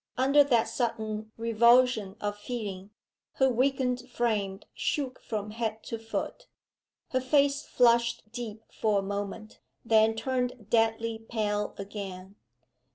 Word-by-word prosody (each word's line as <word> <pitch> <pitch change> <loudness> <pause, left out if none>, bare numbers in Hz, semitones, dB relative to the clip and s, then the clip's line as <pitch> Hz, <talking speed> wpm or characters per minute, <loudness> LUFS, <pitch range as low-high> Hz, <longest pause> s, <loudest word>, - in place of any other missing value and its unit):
Under 275 +3 +6
that 240 -5 +2
sudden 220 -2 -2
revulsion 230 -2 +4
of 205 0 -2
feeling, 205 -3 -5 0.4
her 265 -1 +3
weakened 255 0 0
frame 210 -5 -1
shook 275 -5 -2
from 210 -1 -4
head 220 -1 -3
to 230 - -5
foot. 225 - -5 0.6
Her 260 - 0
face 280 +2 +2
flushed 235 -1 +3
deep 225 -2 -6
for 215 -2 +1
a 195 - 0
moment 200 +2 -5 0.3
then 220 0 +4
turned 250 -2 -2
deadly 225 0 +2
pale 210 -2 -2
again. 195 -1 -7
225 Hz, 120 wpm, -29 LUFS, 210-250 Hz, 0.6 s, Under